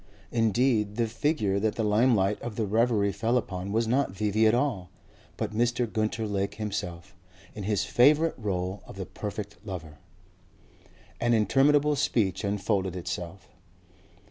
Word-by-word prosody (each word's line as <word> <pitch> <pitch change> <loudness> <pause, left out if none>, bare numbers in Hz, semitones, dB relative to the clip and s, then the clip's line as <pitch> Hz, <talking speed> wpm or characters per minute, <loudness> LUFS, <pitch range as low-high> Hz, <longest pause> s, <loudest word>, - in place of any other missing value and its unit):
Indeed 115 -2 +2
the 120 0 +1
figure 110 -4 0
that 110 +1 0
the 115 - -1
limelight 105 -2 +2
of 120 -3 -5
the 110 - -1
reverie 110 -1 +2
fell 115 +5 0
upon 95 -4 -4
was 115 +2 +1
not 135 +4 +2
V.V. 105 +3 +1
at 110 - +4
all 120 -9 -1 0.5
but - - -3
Mr. 120 +2 +1
Gunter 110 0 -2
Lake 100 -1 -2
himself, 100 -4 -5 0.4
in 105 - -6
his 105 -1 +1
favourite 150 +6 +4
role 95 -3 -3
of - - -10
the 95 -1 -5
perfect 105 +1 -6
lover. 85 -7 -7 1.2
An 120 0 +2
interminable 145 +6 +3
speech 105 - 0
unfolded 100 -2 -1
itself. 90 +1 -6
105 Hz, 145 wpm, -27 LUFS, 100-120 Hz, 1.2 s, at